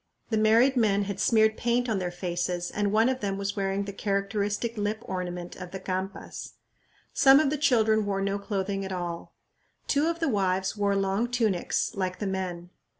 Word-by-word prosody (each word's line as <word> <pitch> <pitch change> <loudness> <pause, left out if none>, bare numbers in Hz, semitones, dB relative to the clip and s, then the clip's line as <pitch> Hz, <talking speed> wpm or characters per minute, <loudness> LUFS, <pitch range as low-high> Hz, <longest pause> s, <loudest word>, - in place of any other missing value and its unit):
The 220 - +2
married 230 +5 +4
men 205 -4 +3
had 200 -1 -5
smeared 220 +1 +4
paint 240 +1 +1
on 215 -4 0
their 180 -1 -2
faces, 175 0 -3
and 205 -1 0
one 220 +2 +4
of 260 0 0
them 195 -3 -2
was 200 0 -3
wearing 195 0 -1
the 200 - -6
characteristic 205 +3 -1
lip 210 +1 -2
ornament 180 -1 -5
of 180 -1 -7
the 190 - -6
Campas. 190 +1 -5 0.6
Some 270 +1 +7
of 300 -3 +2
the - - +1
children 220 -6 +3
wore 195 -1 0
no 200 +1 -1
clothing 195 -1 -2
at 190 - -5
all. 175 -2 -5 0.5
Two 290 +2 +2
of 335 0 -1
the 325 - 0
wives 190 -4 0
wore 200 -1 +1
long 195 +4 0
tunics 225 -4 0
like 185 -3 -2
the 210 - -4
men. 180 -2 -4
200 Hz, 190 wpm, -27 LUFS, 190-220 Hz, 0.6 s, Some